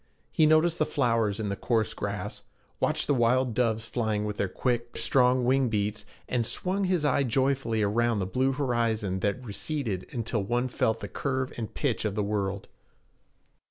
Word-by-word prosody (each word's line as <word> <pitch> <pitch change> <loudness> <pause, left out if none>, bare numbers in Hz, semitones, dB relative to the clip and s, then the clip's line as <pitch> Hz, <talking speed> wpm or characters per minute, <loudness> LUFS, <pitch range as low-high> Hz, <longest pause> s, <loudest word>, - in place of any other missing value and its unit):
He 155 - +4
noticed 160 +2 +3
the 155 - +3
flowers 115 -6 +1
in 105 -2 -2
the 100 - -1
coarse 110 0 0
grass, - - -4 0.4
watched - - +1
the - - +2
wild 125 0 +2
doves 115 -2 +1
flying 110 -3 -1
with 105 -1 -4
their 100 - 0
quick, 120 +1 -2
strong 125 -1 +3
wing 130 0 +3
beats, 105 0 -1 0.2
and 125 -2 0
swung 190 - -1
his 180 -4 +1
eye 140 -1 +3
joyfully 130 -3 +1
around 115 +2 +2
the 95 - -1
blue 130 +8 +1
horizons 115 -8 0
that 125 +5 -1
receded 105 -1 -3
until 115 -4 -1
one 120 +5 0
felt 110 -2 0
the - - -4
curve 130 -2 -2
and 115 -3 -6
pitch 140 -6 0
of 105 -2 -1
the 105 - 0
world. 100 -1 -2
120 Hz, 175 wpm, -28 LUFS, 105-130 Hz, 0.4 s, He